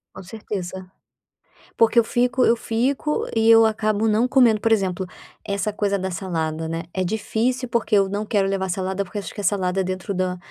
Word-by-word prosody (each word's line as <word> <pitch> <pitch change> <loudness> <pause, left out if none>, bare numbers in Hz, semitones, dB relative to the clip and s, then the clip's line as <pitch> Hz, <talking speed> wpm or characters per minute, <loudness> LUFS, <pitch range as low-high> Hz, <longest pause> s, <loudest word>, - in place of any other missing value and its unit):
Com - - -9
certeza. 190 -2 -6 0.9
Porque 230 +1 +5
eu - - +4
fico 250 +2 +1
eu 235 - +4
fico 260 +7 -1
e 225 0 +2
eu 225 0 +7
acabo 215 0 0
não 220 +3 +2
comendo, 245 -5 +4
por 225 - 0
exemplo, 190 -3 +1 0.4
essa 200 +1 -2
coisa 200 -1 -1
da 190 - -3
salada, 165 -3 -3
né, 165 +1 -4
é 185 - -1
difícil 230 +6 -1
porque 235 -2 +1
eu 195 -1 +3
não 205 +2 -3
quero 200 -2 +1
levar 195 -1 -1
salada, 190 +2 -2
porque 205 +2 -6
acho 195 - -7
que - - -6
a - - -8
salada 190 -2 0
dentro 185 +1 -4
da 185 -1 -1
205 Hz, 195 wpm, -22 LUFS, 185-225 Hz, 0.9 s, eu